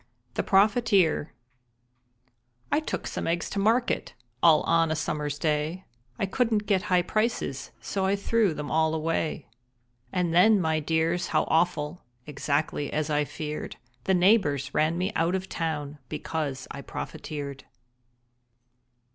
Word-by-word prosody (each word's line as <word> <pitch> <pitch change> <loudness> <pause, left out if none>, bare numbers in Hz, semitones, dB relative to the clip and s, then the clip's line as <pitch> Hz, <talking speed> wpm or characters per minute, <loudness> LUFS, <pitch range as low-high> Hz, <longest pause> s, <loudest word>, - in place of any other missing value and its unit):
THE - - 0
PROFITEER 200 - +3 1.4
I - - +4
took 310 - -4
some - - -3
eggs 170 0 -1
to 200 - -2
market 230 +5 +1 0.3
All 160 -2 +6
on 165 -1 +3
a 160 - 0
summer's 150 -1 -2
day. 155 +4 -1 0.3
I - - 0
couldn't 220 0 0
get 195 -3 +2
high 180 -1 +4
prices, 215 - -1
So 120 - -2
I 195 - +2
threw 200 -3 +1
them 150 -1 -5
all 160 0 +2
away. 160 -1 -2 0.6
And 180 -3 0
then, 205 +4 +6
my 160 -3 +1
dears, 160 +3 0
how - - +2
awful, 160 -1 +1 0.2
(Exactly 145 0 -1
as 155 0 -1
I 150 0 +2
feared) 150 +1 -5 0.3
The 190 - +3
neighbors 175 - +3
ran 155 +2 +2
me 185 +3 -1
out 170 +3 +2
of 190 0 -3
town 150 -4 -3
Because 150 -3 -3
I 140 - -6
profiteered. 140 -1 -6
165 Hz, 140 wpm, -27 LUFS, 150-190 Hz, 1.4 s, All